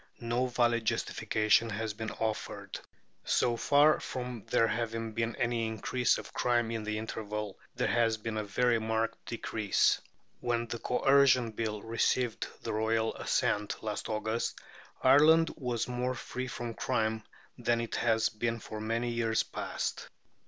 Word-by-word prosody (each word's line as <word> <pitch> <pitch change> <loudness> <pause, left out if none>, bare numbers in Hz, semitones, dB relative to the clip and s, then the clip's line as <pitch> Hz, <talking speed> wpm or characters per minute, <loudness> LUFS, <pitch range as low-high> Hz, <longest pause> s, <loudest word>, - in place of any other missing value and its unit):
No 120 +2 0
valid 120 -2 +2
justification 110 +1 +2
has 110 0 -3
been 110 +1 -4
offered. 110 -1 -4 0.4
So 120 -1 +2
far 145 +5 +4
from 125 -3 -5
there 115 - +3
having 115 0 -2
been 115 +1 -2
any 120 -1 0
increase 110 +3 +1
of - - -9
crime 120 -2 +1
in 115 -1 -2
the 105 0 -2
interval, 105 -2 -5 0.2
there - - 0
has 115 -2 +2
been 110 +1 -4
a 105 - -1
very 115 +3 +2
marked 110 +1 -1
decrease. 110 -3 +1 0.4
When 120 -1 0
the 120 0 -5
Coercion 130 -2 +4
Bill 110 -1 -3
received 115 +1 0 0.2
the - - -3
royal 110 +1 +1
assent 105 +1 -1
last 105 -1 -3
August, 110 +1 -2 0.4
Ireland 155 +5 +6
was 125 -6 -2
more 125 +1 -1
free 125 +1 -5
from 120 -2 -5
crime 110 0 -1 0.4
than 120 -1 +1
it 115 -1 -3
had 115 -1 +2 0.2
been 115 0 0
for 110 0 -7
many 115 +2 -1
years 115 -1 +1
past. - - -4
115 Hz, 145 wpm, -31 LUFS, 110-120 Hz, 0.4 s, Ireland